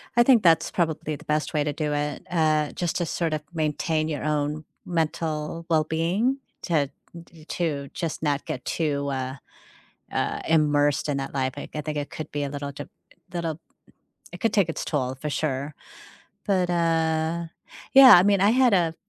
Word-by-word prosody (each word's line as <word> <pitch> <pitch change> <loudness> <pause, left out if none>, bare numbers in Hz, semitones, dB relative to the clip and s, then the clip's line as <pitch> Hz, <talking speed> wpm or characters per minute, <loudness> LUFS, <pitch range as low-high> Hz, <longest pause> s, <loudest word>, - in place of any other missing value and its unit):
I 240 - +6
think 240 -3 +5
that's 165 -2 +4
probably 160 -3 -1
the 155 +3 -13
best 150 0 -1
way 150 -1 +2
to 145 0 -2
do 150 -1 -2
it, 145 0 -2
uh, 155 -3 +2
just 175 -2 -2
to 175 - 0
sort 165 -1 -1
of 155 - -2
maintain 155 0 0
your 150 -2 -3
own 150 0 -1 0.2
mental 160 -1 -2
well-being 165 - +1 0.3
to 150 -5 +1 0.4
t 160 -2 -17
to 150 -6 -2
just 165 -3 -4
not 145 -2 0
get 125 - -5
too, 140 -3 -1
uh, 130 -1 -3 0.8
uh, - - -1
immersed 145 -2 +2
in 145 - 0
that 135 0 -4
life, 130 -1 -1
I 145 - -5
c - - -12
I 155 - -2
think 150 0 -4
it 145 - -4
could 155 -1 -7
be 145 -1 -2
a - - -2
little 140 0 -5
de 140 - -8 0.4
little 170 -2 -3 0.7
it - - -8
could 225 -2 +1
take 195 -5 +3
its 165 - -3
toll 130 -4 -2
for 150 - -3
sure. 140 0 -2 0.7
But, 185 -3 +1
uh 165 -1 +1 0.5
yeah, 265 -2 +11
I 175 - +5
mean, 200 -1 +3
I 205 +2 +5
had 250 -2 +4
a 170 -4 +2
155 Hz, 185 wpm, -25 LUFS, 145-170 Hz, 0.8 s, yeah